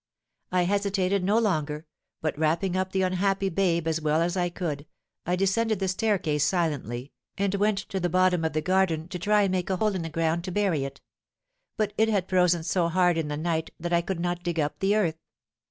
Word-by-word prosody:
I 180 Hz, -1 st, +3 dB
hesitated 200 Hz, 0 st, +1 dB
no 205 Hz, +4 st, +2 dB
longer, 155 Hz, -8 st, 0 dB, 0.4 s
but, 155 Hz, -1 st, -1 dB
wrapping 165 Hz, +5 st, 0 dB
up 185 Hz, 0 st, -1 dB
the 190 Hz, 0 st, +1 dB
unhappy 195 Hz, +1 st, +1 dB
babe 170 Hz, -3 st, +1 dB
as 160 Hz, 0 st, 0 dB
well 155 Hz, +1 st, +2 dB
as 170 Hz, +2 st, 0 dB
I 175 Hz, -1 st, +1 dB
could, 155 Hz, -5 st, -4 dB, 0.4 s
I 180 Hz, -, +2 dB
descended 210 Hz, +4 st, +1 dB
the 190 Hz, 0 st, -1 dB
staircase 185 Hz, -7 st, +1 dB
silently, 145 Hz, -, -1 dB, 0.3 s
and 200 Hz, 0 st, 0 dB
went 205 Hz, +1 st, +2 dB
to 190 Hz, -, -2 dB
the 175 Hz, -1 st, 0 dB
bottom 180 Hz, -1 st, +3 dB
of 160 Hz, -, -1 dB
the 155 Hz, 0 st, -1 dB
garden 180 Hz, -3 st, +1 dB
to 180 Hz, -, -5 dB
try 210 Hz, +3 st, +3 dB
and 195 Hz, -, +1 dB
make 185 Hz, -1 st, -1 dB
a 190 Hz, -, 0 dB
hole 215 Hz, +2 st, +1 dB
in 185 Hz, -, -2 dB
the 165 Hz, -, -4 dB
ground 165 Hz, +1 st, 0 dB
to 185 Hz, -, -4 dB
bury 180 Hz, -8 st, +1 dB
it; 135 Hz, 0 st, -8 dB, 0.8 s
but 210 Hz, -1 st, 0 dB
it 220 Hz, 0 st, +4 dB
had 195 Hz, -4 st, 0 dB
frozen 180 Hz, -2 st, +3 dB
so 170 Hz, +1 st, +1 dB
hard 180 Hz, 0 st, +3 dB
in 160 Hz, -2 st, -1 dB
the 150 Hz, 0 st, -3 dB
night 160 Hz, 0 st, -1 dB
that 175 Hz, +1 st, -3 dB
I 170 Hz, -, +4 dB
could 180 Hz, 0 st, -4 dB
not 175 Hz, 0 st, -2 dB
dig 170 Hz, -2 st, -2 dB
up 145 Hz, -1 st, -1 dB
the 195 Hz, +2 st, +2 dB
earth. 165 Hz, -7 st, 0 dB
180 Hz, 220 wpm, -26 LUFS, 160-195 Hz, 0.8 s, it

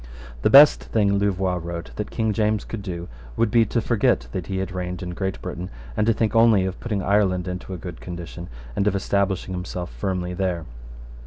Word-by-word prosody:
The -, -, +3 dB
best 145 Hz, +2 st, +8 dB
thing, 100 Hz, -3 st, +2 dB
Louvois 95 Hz, -2 st, 0 dB
wrote, 85 Hz, 0 st, -6 dB
that 105 Hz, -, -3 dB
King 110 Hz, -2 st, 0 dB
James 105 Hz, -1 st, +1 dB
could 115 Hz, -, -5 dB
do 90 Hz, -3 st, -5 dB, 0.3 s
would 115 Hz, -2 st, +2 dB
be 115 Hz, 0 st, +5 dB
to 115 Hz, -, 0 dB
forget 110 Hz, -, +2 dB
that 90 Hz, +4 st, -4 dB
he 95 Hz, -, -2 dB
had 95 Hz, 0 st, -2 dB
reigned 90 Hz, 0 st, -4 dB
in 90 Hz, -, -4 dB
Great 95 Hz, +1 st, -3 dB
Britain, 90 Hz, 0 st, -5 dB, 0.3 s
and 105 Hz, -, +1 dB
to 115 Hz, -, +5 dB
think 110 Hz, 0 st, 0 dB
only 115 Hz, -4 st, +5 dB
of 95 Hz, -1 st, -4 dB
putting 105 Hz, -5 st, -2 dB
Ireland 95 Hz, -2 st, +2 dB
into 90 Hz, +1 st, -5 dB
a 95 Hz, -, -4 dB
good 85 Hz, -1 st, -8 dB
condition, 85 Hz, 0 st, -7 dB, 0.3 s
and 100 Hz, -, +1 dB
of 100 Hz, -, +2 dB
establishing 100 Hz, -1 st, 0 dB
himself 90 Hz, -2 st, -5 dB
firmly 90 Hz, +8 st, -3 dB
there. 90 Hz, -3 st, -2 dB
95 Hz, 200 wpm, -23 LUFS, 90-105 Hz, 0.3 s, best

